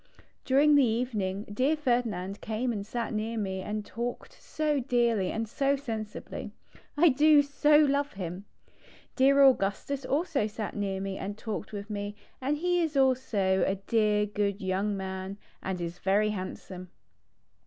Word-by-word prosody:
During 285 +3 +5
the 285 -1 +6
evening 220 -5 -1
dear 255 +9 0
Ferdinand 225 -9 -1
came 230 +3 -2
and 205 -2 -3
sat 230 +2 -4
near 220 +2 -2
me 190 -3 -2
and 210 +2 -4
talked 240 +2 -5
so 305 -2 -1
dearly 235 -6 +1
and 225 0 -2
so 275 +5 +1
sensibly. 225 -6 -6 0.5
I 340 +3 +6
do 295 +2 +5
so 295 +1 +4
love 285 -1 +2
him. 185 0 -6 0.7
Dear 275 +1 +5
Augustus 265 +2 +2
also 285 - 0
sat 215 0 -5
near 195 -2 -2
me 195 0 -4
and 205 +1 -5
talked 220 -2 -5
with 205 -1 -6
me 205 0 -4 0.3
and 285 +3 0
he 355 +2 +1
is 315 -3 -1
also 225 -8 +2
a 195 - +1
dear 210 +1 +1
good 205 -1 -1
young 195 +2 -1
man, 190 +1 -5 0.2
and 190 -1 -3
is 170 0 -5
very 205 +2 +2
handsome. 185 -2 -7
220 Hz, 155 wpm, -29 LUFS, 200-270 Hz, 0.7 s, the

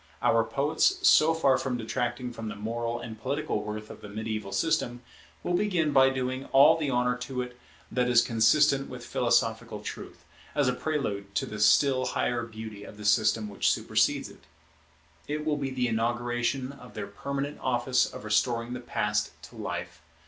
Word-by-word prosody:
Our 115 0 +4
poets, 155 - +1
so 160 +1 +6
far 135 -5 +3
from 130 -2 -2
detracting 120 +1 -3
from 115 -1 -6
the 105 - -5
moral 115 +3 -3
and 110 -2 -8
political 130 -4 -2
worth 105 0 -6
of - - -12
the 105 - -9
mediaeval 110 -1 -4
system, 125 -6 0 0.4
will 175 - -1
begin 175 -5 +1
by 135 -1 +6
doing 130 0 -3
all 135 +1 +6
the 155 -3 -2
honour 125 -1 +1
to 125 +1 -3
it 125 0 -11 0.3
that 125 -1 +1
is 120 -1 +5
consistent 135 +5 +3
with - - -8
philosophical - - 0
truth, - - -8 0.3
as 145 -3 +2
a 125 - +2
prelude 105 -10 -3
to - - +1
the 105 - -7
still 130 +5 +4
higher 120 -1 0
beauty 110 -3 -8
of 105 - -11
the 105 - -9
system 110 +1 +3
which 100 - +1
supersedes - - +1
it. - - -16 0.8
It 150 +1 -3
will 150 -1 +1
be 140 -2 -2
the 130 -2 -1
inauguration 120 +3 -1
of 125 -3 -14
their - - -4
permanent 140 +1 -4
office 125 0 +1
of - - -9
restoring 115 +2 +1
the 125 - -4
Past 105 -3 -2
to - - -16
life. - - -5
125 Hz, 180 wpm, -28 LUFS, 110-135 Hz, 0.8 s, so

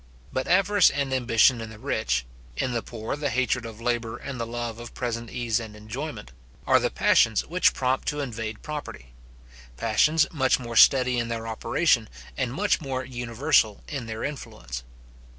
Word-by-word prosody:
But 130 - -1
avarice 195 +1 +5
and 140 -2 -2
ambition 120 -1 +4
in 115 - -6
the 110 - -11
rich, - - -1 0.3
in 130 - 0
the 115 - 0
poor 110 +2 -5
the 145 -1 -2
hatred 125 -1 0
of 110 -1 -10
labour 115 -1 -1
and 135 -3 -7
the 115 - -2
love 120 -1 -4
of 120 0 -10
present 120 -2 -3
ease 120 -2 -1
and 110 -2 -8
enjoyment, 110 - -7 0.3
are - - +5
the - - 0
passions 110 -1 +3
which 180 +2 +2
prompt 130 0 0
to 150 - -1
invade 115 -5 -5
property; 145 - -7 0.6
passions 150 - +3
much 130 -4 +3
more 120 -2 -7
steady 125 0 +6
in 115 - -1
their 115 -1 -4
operation, 115 +1 +1 0.3
and 130 -3 -1
much 195 +6 +1
more 130 -3 -3
universal 120 -2 +1
in 135 -6 -5
their 110 0 -5
influence. 65 - -6
120 Hz, 170 wpm, -26 LUFS, 115-135 Hz, 0.6 s, steady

